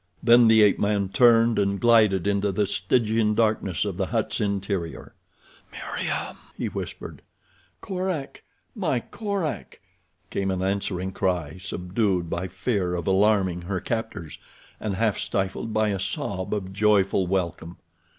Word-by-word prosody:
Then 120 0 +7
the 110 -1 +6
ape 105 - +4
man 100 -2 +1
turned 115 +1 +4
and 100 -1 0
glided 110 -6 +4
into 100 0 +1
the 105 +2 +1
Stygian 105 +3 +1
darkness 110 -6 +1
of 100 -4 -4
the 95 -1 -1
hut's 115 +1 -1
interior. 100 -4 -3 0.6
"Meriem!" - - -4 0.2
he - - -2
whispered. - - -7 0.6
"Korak! 185 -6 -4 0.3
My 170 - 0
Korak!" 200 - -4 0.5
came 95 0 -1
an 95 -1 -1
answering 95 -1 -2
cry, 90 -3 -2
subdued 90 -1 -1
by 90 +2 -2
fear 95 -1 -1
of 85 -2 -4
alarming 95 -2 +2
her 95 +2 -3
captors, 110 - -4 0.4
and 105 -3 -3
half 110 0 0
stifled 95 +3 -2
by 110 0 +1
a 100 -2 -1
sob 95 -1 -3
of 95 -3 -3
joyful 100 -2 +2
welcome. 85 -2 -2
100 Hz, 135 wpm, -25 LUFS, 95-110 Hz, 0.6 s, Then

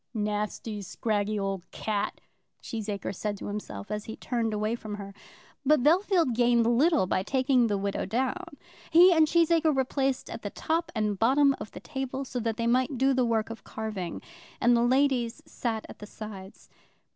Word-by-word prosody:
"Nasty, 210 0 -2
scraggy 210 +2 -1
old 195 -2 -3
cat," 210 -1 -3 0.4
Cheesacre 210 -3 -4
said 205 +2 -3
to - - -8
himself, 205 - -6
as 210 0 -3
he 220 - -6
turned 235 -3 -2
away 215 +1 -1
from 215 -3 -5
her. 200 -1 -8 0.5
But 290 -2 +4
Bellfield 340 - +3
gained 240 0 +3
little 275 - +3
by 185 0 0
taking 255 +2 +2
the 205 -2 0
widow 200 0 -2
down. 275 +7 -2 0.3
He 355 +2 +7
and 320 -2 +5
Cheesacre 330 -2 +3
were 265 -1 +2
placed 270 0 -1
at - - -7
the - - -4
top 330 +1 -2
and 210 -3 0
bottom 275 +4 +4
of - - -6
the - - -7
table, 270 -1 -4
so 250 -1 -4
that 225 -1 -2
they 230 - -1
might 255 +3 +2
do 270 +2 +3
the 255 -1 +2
work 225 -1 0
of 230 - -9
carving; 210 -6 -5 0.4
and 240 +1 +4
the 235 - +3
ladies 250 -1 +2
sat 225 -3 -3
at - - -12
the 210 - -9
sides. 205 -3 -10
235 Hz, 180 wpm, -28 LUFS, 210-270 Hz, 0.5 s, He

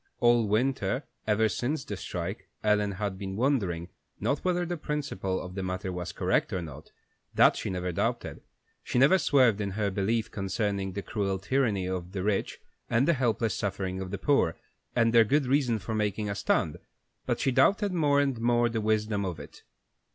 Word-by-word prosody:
All 120 -2 +4
winter, 130 +5 0 0.2
ever 110 +1 +3
since 125 - -2
the - - -4
strike, - - -5
Ellen 105 -1 +2
had 95 -1 -3
been 95 -1 -5
wondering, 100 -9 0 0.3
not 140 - 0
whether 180 -1 0
the 175 +1 -3
principle 140 - -3
of 90 - -7
the 95 - -4
matter 95 +1 -3
was 90 -1 -4
correct - - 0
or 90 - -2
not, 75 -1 -10 0.4
that - - +6
she - - -3
never 90 -1 -2
doubted; 85 - -2 0.4
she - - -3
never 140 +9 +6
swerved 125 - +4
in 100 - -1
her 105 -2 0
belief 105 +4 0
concerning 100 -1 -2
the 100 +1 -4
cruel 100 -3 -1
tyranny 105 -2 0
of 90 0 -4
the 95 -2 -3
rich 100 -1 -1 0.3
and 120 +4 +2
the 170 - +5
helpless 120 -5 0
suffering 95 -2 -3
of 95 - -5
the 100 - -3
poor, 95 - +2 0.4
and 115 -1 +3
their 115 -1 +8
good 140 +6 +2
reason 130 -3 +2
for 105 +2 -5
making 105 -1 -1
a - - -1
stand, 85 -5 0 0.5
but - - 0
she 135 - +1
doubted 200 - +3
more 145 -4 +3
and 135 -5 0
more 120 0 +3
the 115 -1 -2
wisdom 105 -1 0
of 90 -5 -4
it. 70 - -12
105 Hz, 190 wpm, -28 LUFS, 95-125 Hz, 0.5 s, their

